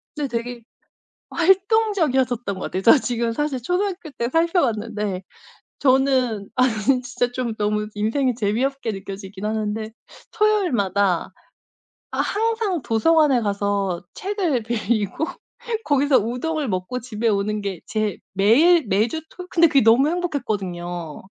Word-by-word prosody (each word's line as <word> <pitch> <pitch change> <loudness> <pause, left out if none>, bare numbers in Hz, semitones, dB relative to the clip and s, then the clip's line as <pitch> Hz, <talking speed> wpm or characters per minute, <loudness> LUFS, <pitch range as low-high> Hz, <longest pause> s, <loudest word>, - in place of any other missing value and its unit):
네 295 -2 -2
되게 240 0 -4 0.7
활동적이었었던 340 - +2
것 185 - -8
같아요. 190 - -3
저 230 - +8
지금 235 -2 -1
사실 280 0 -2
초등학교 360 - -2
때 235 -2 -3
살펴 335 +4 +2
봤는데 210 - -2 0.6
저는 255 -6 +2
아니 255 -2 +3 0.3
진짜 245 -1 -2
좀 245 -2 -3
너무 210 0 0
인생이 220 +7 0
너무 - - -13
재미없게 240 +3 -1
느껴지긴 195 0 -7
하는데 215 0 -2 0.4
토요일마다 220 - +1 0.8
아 - - -5
항상 440 - 0
도서관에 275 +4 +3
가서 200 -3 -1
책을 370 - -1
빌리고 225 +1 -1 0.6
거기서 285 -1 +3
우동을 275 +6 -2
먹고 185 +6 -3
집에 230 -1 -2
오는 210 0 0
게 195 -4 -4
제일 215 -4 -2
매일, 275 - +4
매주 220 +12 +1
토 360 - -9
근데 335 -1 +5
그게 280 -3 +4
너무 235 +6 +5
행복했거든요. 190 - -3
240 Hz, 295 characters per minute, -22 LUFS, 210-300 Hz, 0.8 s, 저